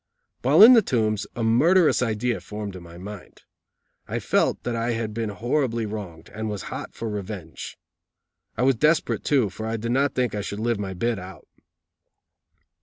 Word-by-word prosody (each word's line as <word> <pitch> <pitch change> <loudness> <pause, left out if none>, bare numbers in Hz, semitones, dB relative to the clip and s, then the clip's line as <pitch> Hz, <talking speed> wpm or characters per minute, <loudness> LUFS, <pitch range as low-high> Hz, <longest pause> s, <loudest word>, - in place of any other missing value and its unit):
While 140 - +6
in 240 +3 +11
the 230 - +7
Tombs 110 - 0
a 120 - -2
murderous 155 +11 +4
idea 120 0 0
formed 105 -2 -6
in 90 - -8
my 85 0 -12
mind. 100 +1 -10 0.6
I - - -3
felt - - +1
that 120 - -2
I 115 +1 -1
had 115 -2 -3
been 115 -1 -2
horribly 115 +1 -1
wronged, 100 -7 -7
and 110 0 -4
was 105 -4 -4
hot - - -7
for 115 - -4
revenge. 100 -6 -6 0.8
I 125 - +1
was 135 +1 +5
desperate, 155 +5 +2
too, 130 -9 +2
for 110 +4 -6
I 115 0 -2
did 115 +2 -3
not 135 +3 +1
think 125 -4 0
I 105 - -2
should 100 +1 -5
live 115 -1 0
my 95 -2 -4
bit 115 +3 -1
out. 90 +1 -11
110 Hz, 180 wpm, -24 LUFS, 105-125 Hz, 0.8 s, in